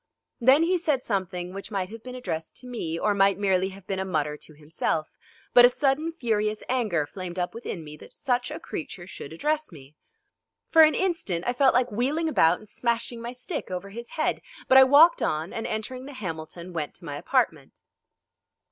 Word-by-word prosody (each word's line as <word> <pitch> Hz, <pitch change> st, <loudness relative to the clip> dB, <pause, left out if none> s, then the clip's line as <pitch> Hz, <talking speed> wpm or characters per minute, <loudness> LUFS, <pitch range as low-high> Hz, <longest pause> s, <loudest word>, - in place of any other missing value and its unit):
Then 265 Hz, +6 st, +6 dB
he 360 Hz, +2 st, +2 dB
said 300 Hz, -6 st, 0 dB
something 185 Hz, -3 st, -3 dB
which 195 Hz, 0 st, -7 dB
might 195 Hz, -3 st, -2 dB
have 225 Hz, +1 st, -9 dB
been 250 Hz, +1 st, -8 dB
addressed 165 Hz, -11 st, -5 dB
to 250 Hz, 0 st, -11 dB
me 170 Hz, -10 st, -3 dB
or 205 Hz, -, +1 dB
might 195 Hz, -1 st, +3 dB
merely 190 Hz, -2 st, +1 dB
have 195 Hz, -1 st, -13 dB
been 190 Hz, 0 st, -3 dB
a -, -, 0 dB
mutter 150 Hz, -5 st, -1 dB
to 155 Hz, +1 st, -13 dB
himself, 155 Hz, +1 st, -2 dB, 0.4 s
but 245 Hz, -, +9 dB
a 245 Hz, -, +9 dB
sudden 285 Hz, +5 st, 0 dB
furious 215 Hz, -8 st, -1 dB
anger 215 Hz, -, +1 dB
flamed 185 Hz, +2 st, -7 dB
up 180 Hz, -1 st, -2 dB
within 220 Hz, -7 st, -6 dB
me 150 Hz, 0 st, -10 dB
that -, -, -14 dB
such 245 Hz, -3 st, -1 dB
a -, -, -6 dB
creature 175 Hz, +2 st, -7 dB
should 165 Hz, -5 st, -9 dB
address 300 Hz, -, -1 dB
me. 140 Hz, -3 st, -14 dB, 0.8 s
For 325 Hz, -, +7 dB
an 310 Hz, -1 st, +6 dB
instant 330 Hz, -, -1 dB
I 245 Hz, -, +1 dB
felt 265 Hz, 0 st, +4 dB
like 250 Hz, -1 st, +2 dB
wheeling 275 Hz, +10 st, 0 dB
about 175 Hz, -, +4 dB
and 215 Hz, -, -15 dB
smashing 235 Hz, +1 st, -2 dB
my 235 Hz, +1 st, -5 dB
stick 250 Hz, +6 st, -5 dB
over 185 Hz, +2 st, -5 dB
his 235 Hz, +3 st, -8 dB
head, 310 Hz, -, 0 dB, 0.3 s
but 265 Hz, -, +8 dB
I -, -, +10 dB
walked 290 Hz, +6 st, +6 dB
on, 155 Hz, +4 st, -1 dB
and 225 Hz, -, -3 dB
entering 250 Hz, +4 st, -4 dB
the 285 Hz, -, -9 dB
Hamilton 170 Hz, -4 st, -6 dB
went 155 Hz, -3 st, -4 dB
to -, -, -14 dB
my 145 Hz, -2 st, -5 dB
apartment. 145 Hz, -, -1 dB
210 Hz, 200 wpm, -26 LUFS, 175-255 Hz, 0.8 s, I